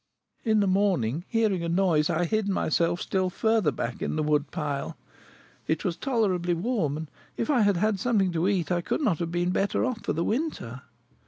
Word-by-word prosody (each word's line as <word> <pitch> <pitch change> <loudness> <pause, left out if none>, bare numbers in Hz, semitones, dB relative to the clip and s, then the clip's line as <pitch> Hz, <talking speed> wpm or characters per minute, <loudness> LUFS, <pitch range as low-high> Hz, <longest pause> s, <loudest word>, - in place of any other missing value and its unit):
In 220 -3 +3
the 200 - +2
morning, 180 - +1
hearing 215 -6 +1
a 170 - -2
noise, 170 -4 +2
I 170 +1 +1
hid 215 +3 0
myself 170 -2 +1
still 185 -1 0
further 220 -3 +1
back 120 -1 -4
in - - -2
the 155 - 0
wood 150 -1 +1
pile. 145 -3 -3 0.7
It 160 - -1
was 175 -3 0
tolerably 185 -8 0
warm, 170 - -1
and, 160 -1 -7 0.3
if 230 - 0
I 255 -5 +3
had 205 -3 +3
had 210 +1 +1
something 200 -4 +2
to 170 +2 0
eat, 190 -4 0
I 175 -1 +1
could 185 - -2
not 205 - +1
have 170 -1 -2
been 175 +1 0
better 195 +6 +1
off 250 -4 -3
for 200 - -2
the 165 - -1
winter." 215 - -2
180 Hz, 200 wpm, -27 LUFS, 165-215 Hz, 0.7 s, In